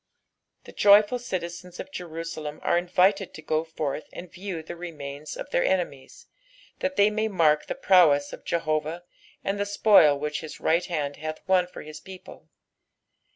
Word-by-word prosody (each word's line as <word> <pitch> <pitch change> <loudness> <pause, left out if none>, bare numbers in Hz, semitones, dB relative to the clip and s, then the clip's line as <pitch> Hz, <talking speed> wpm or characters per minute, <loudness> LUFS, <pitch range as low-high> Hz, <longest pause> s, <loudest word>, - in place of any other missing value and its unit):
The - - -13
jOTful 205 +4 +5
citizens 180 -5 -6
of - - -7
Jenuateni 165 -3 -6
an - - +2
invited 185 +2 +1
to 160 - -9
go 155 +1 0
forth 155 -2 -4
and 175 -1 -9
view 185 -3 -6
the 175 - -8
remains 150 -4 -7
of - - -7
their - - +2
eDemies, 175 -9 -2 0.5
thst 280 0 -2
thej 205 +1 +4
msy 215 +1 -1
mark 155 -6 +2
the - - -3
prowess 165 - +4
of - - -9
Jehcvsh 155 +1 -2 0.4
and 195 +1 -2
the 205 - 0
spoil 200 -8 +5
which 150 +1 -3
his 155 -2 -9
right 170 +2 +2
hand 145 -5 -3
bath 155 0 -5
won 185 -2 +3
for - - -10
his 150 0 -9
people. 190 +2 -13
170 Hz, 165 wpm, -26 LUFS, 155-190 Hz, 0.5 s, jOTful